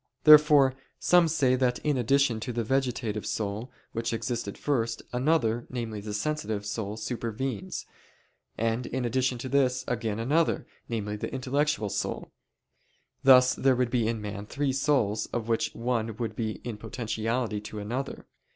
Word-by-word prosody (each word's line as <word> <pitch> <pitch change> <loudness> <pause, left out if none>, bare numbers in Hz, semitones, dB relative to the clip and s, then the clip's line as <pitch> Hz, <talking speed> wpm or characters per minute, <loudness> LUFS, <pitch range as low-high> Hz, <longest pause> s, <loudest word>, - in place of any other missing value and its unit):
Therefore 150 -3 +8 0.2
some 175 -2 +4
say 145 -5 +2
that 125 -1 +1
in 150 -1 +2
addition 125 -1 +2
to 110 - -4
the 120 0 -1
vegetative 120 -4 -1
soul 105 +4 -3 0.2
which 115 0 -2
existed 115 -3 -3
first, 120 -6 -1
another, 125 -4 +1
namely 115 -4 -4
the 105 +1 -6
sensitive, 110 -5 -2
soul 105 0 -3
supervenes; 115 0 -4 0.7
and 115 +2 0
in 130 0 -2
addition 125 +1 +1
to 120 - -5
this, 130 -1 +2
again 115 -3 -1
another, 150 +9 +1 0.2
namely 105 -2 -3
the - - -4
intellectual 135 -3 0
soul. - - -3 0.9
Thus 130 -1 +7
there 135 -1 +3
would 125 -1 0
be 120 -3 +1
in 115 -1 -1
man 105 0 -6
three 140 +1 -1
souls 130 -7 +1
of 115 -2 -4
which 115 -1 +1
one 115 -2 -1
would 115 -3 -3
be 110 -1 -2
in 120 -3 -5
potentiality 110 0 -2
to 105 +1 -8
another. 120 +7 -4
120 Hz, 150 wpm, -28 LUFS, 110-130 Hz, 0.9 s, Therefore